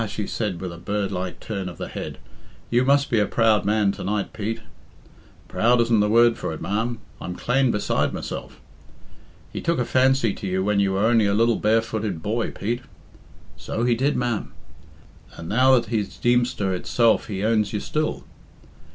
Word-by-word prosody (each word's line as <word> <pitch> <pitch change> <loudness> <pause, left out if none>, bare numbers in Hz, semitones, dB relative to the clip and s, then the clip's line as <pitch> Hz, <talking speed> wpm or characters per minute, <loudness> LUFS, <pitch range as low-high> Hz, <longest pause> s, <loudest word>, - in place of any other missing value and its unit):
she 105 0 -4
said, 100 -6 -3
with 90 -2 -5
a 85 - -10
bird 100 +2 -2
like 90 0 -4
turn 100 -4 -4
of 90 - -11
the - - -5
head, - - -6 0.5
"you 120 +1 +3
must 140 +2 +3
be 115 - +3
a 105 - +2
proud 110 -3 +2
man 105 -1 +2
to - - -7
night, 105 0 -2
Pete." 115 +2 -4 0.9
"Proud 120 +2 +2
isn't 115 -1 +3
the 105 0 +2
word 115 +1 +5
for - - -3
it, 80 - -7
ma'am 110 +4 -2 0.2
I'm 90 - -5
clane 130 +5 +1
beside 105 -3 0
myself." - - -6 0.9
"He - - -4
took 170 -1 0
a 125 - 0
fancy 130 -4 +3
to 100 - -6
you 95 0 0
when 105 0 +1
you 100 -1 +2
were 100 +3 +1
only 115 -2 +4
a 100 - +1
little 115 +1 +3
barefooted 110 -5 0
boy, 115 +2 -1
Pete." 120 +4 -3 0.8
"So 115 - -3
he 120 0 +3
did, 135 +5 +1
ma'am." 120 -3 -2 0.8
"And 85 - -8
now 130 +6 +5
that 120 -3 0
he's 105 -4 -2
Deemster 120 -5 +1
itself 115 +5 +2
he 100 -2 -4
owns 110 -1 +2
you 105 - -2
still." 155 +8 -2
110 Hz, 185 wpm, -23 LUFS, 100-120 Hz, 0.9 s, word